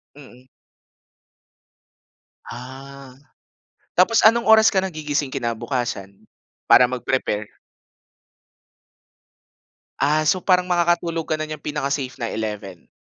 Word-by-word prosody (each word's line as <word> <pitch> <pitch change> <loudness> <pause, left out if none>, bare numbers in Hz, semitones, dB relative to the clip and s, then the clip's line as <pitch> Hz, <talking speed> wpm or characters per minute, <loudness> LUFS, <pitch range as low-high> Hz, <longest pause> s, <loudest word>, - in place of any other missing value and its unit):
Mm. 130 -3 -16 2.1
Ah, 130 +2 -11 0.8
tapos 200 +6 +4
anong 230 +2 +4
oras 220 0 +6
ka - - -2
nagigising 150 -5 -3
kinabukasan? 120 -5 -4 0.4
Para 125 - +7
mag-prepare. 120 -4 -2 2.5
Ah, 150 +2 +2
so 185 +3 +2
parang 180 -1 +2
makakatulog 170 -2 0
ka 155 - +1
na 155 - -3
niyang 155 -1 -8
pinaka-safe 140 -2 -3
na 115 -2 -4
11 105 -5 -6
140 Hz, 90 wpm, -21 LUFS, 120-170 Hz, 2.5 s, Para